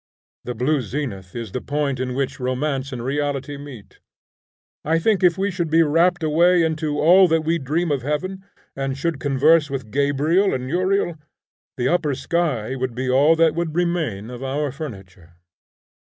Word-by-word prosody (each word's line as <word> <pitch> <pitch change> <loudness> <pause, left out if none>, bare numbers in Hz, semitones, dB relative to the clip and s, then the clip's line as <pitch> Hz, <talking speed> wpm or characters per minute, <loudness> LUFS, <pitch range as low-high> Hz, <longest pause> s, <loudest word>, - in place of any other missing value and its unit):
The 125 - -4
blue 135 +5 +1
zenith 110 -8 -5
is 115 -4 -5
the 125 - -4
point 140 -2 -2
in 125 -1 -3
which 135 -1 -2
romance 135 +2 -2
and 120 -2 -5
reality 145 0 -2
meet. 140 -7 -11 0.8
I 160 +2 +1
think 200 +4 +1
if 175 -1 +4
we 200 +1 0
should 175 -3 -2
be 165 +1 +5
rapt 165 +3 +2
away 170 +3 +4
into 155 -2 -1
all 180 +4 +6
that 165 -1 +2
we 165 +2 0
dream 155 +5 -1
of 140 -3 0
heaven, 185 +8 -3 0.3
and 135 0 -3
should 165 0 -2
converse 145 +3 +3
with 130 -6 -5
Gabriel 145 +7 +2
and 130 0 -4
Uriel, 180 +1 0 0.6
the 125 -1 0
upper 155 -5 +1
sky 135 -5 -1
would 130 -2 -3
be 130 0 -1
all 145 +5 +5
that 165 -1 +3
would 165 -1 -3
remain 160 - -1
of 125 0 -8
our 140 +2 -2
furniture. 95 - -10
145 Hz, 170 wpm, -22 LUFS, 130-165 Hz, 0.8 s, all